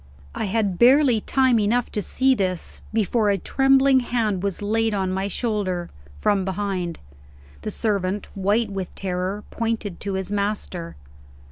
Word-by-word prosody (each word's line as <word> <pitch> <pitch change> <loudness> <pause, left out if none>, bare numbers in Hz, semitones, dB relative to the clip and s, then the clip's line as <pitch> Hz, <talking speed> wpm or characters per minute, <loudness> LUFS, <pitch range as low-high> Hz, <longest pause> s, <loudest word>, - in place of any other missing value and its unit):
I - - -2
had 200 -3 0
barely 250 -2 +5
time 260 -2 +3
enough 230 +4 +1
to 210 - -1
see 265 +6 +2
this, 185 -6 -2
before 220 0 +1
a 200 - +2
trembling 270 +5 +4
hand 225 -6 -1
was 200 0 -2
laid 225 +1 +1
on 190 -2 -1
my 190 +1 -1
shoulder, 200 -5 -2 0.3
from 195 - +1
behind. 190 -3 -2 0.6
The - - -4
servant, 200 -2 -1
white 205 +3 +1
with 190 -2 -5
terror, 190 +2 -3
pointed 225 -5 -2
to 200 -1 -3
his 190 +1 -3
master. 200 -4 -2
205 Hz, 145 wpm, -23 LUFS, 190-230 Hz, 0.6 s, barely